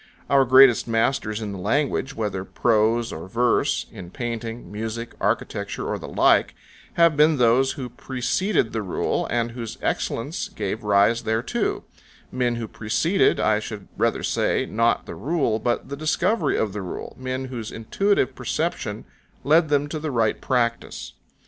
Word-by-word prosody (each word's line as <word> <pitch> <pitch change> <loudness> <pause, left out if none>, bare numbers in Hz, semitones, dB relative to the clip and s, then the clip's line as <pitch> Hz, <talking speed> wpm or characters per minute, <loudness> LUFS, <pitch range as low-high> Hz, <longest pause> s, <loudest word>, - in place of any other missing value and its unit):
Our 135 -1 +5
greatest 130 -1 +6
masters 115 -1 0
in 105 -2 -4
language, 140 +3 0
whether 100 -4 -2
prose 115 +3 +1
or 80 +3 -7
verse, 120 +4 +1
in 90 -2 -9
painting, 115 -2 -5
music, 115 +2 -5
architecture, - - -2
or - - -2
the - - -8
like, - - +3 0.4
have 170 -2 +4
been 150 +1 +4
those 125 +2 +3
who 130 -4 -5
preceded 130 - -1
the 110 - -1
rule 95 -4 -1
and 120 -1 -1
whose 115 -2 -6
excellence - - -2
gave - - -4
rise 105 +3 +3
thereto; 110 +2 -1 0.5
men 125 -2 0
who 115 -1 -4
preceded, 115 - +1
I 110 -1 +2
should 105 -2 -8
rather - - 0
say, - - +1
not 115 +2 +1
the - - -7
rule, 135 - 0
but 120 +2 -1
the 140 - -4
discovery 160 +9 +1
of 105 -3 -1
the 105 - -4
rule, 90 - -7
men 130 0 -3
whose 115 -3 -5
intuitive 165 - 0
perception - - -3 0.4
led 160 +2 +4
them 145 0 +2
to 155 - -4
the 155 0 -3
right 115 -5 0
practice. 120 -3 -1
120 Hz, 155 wpm, -23 LUFS, 110-135 Hz, 0.5 s, greatest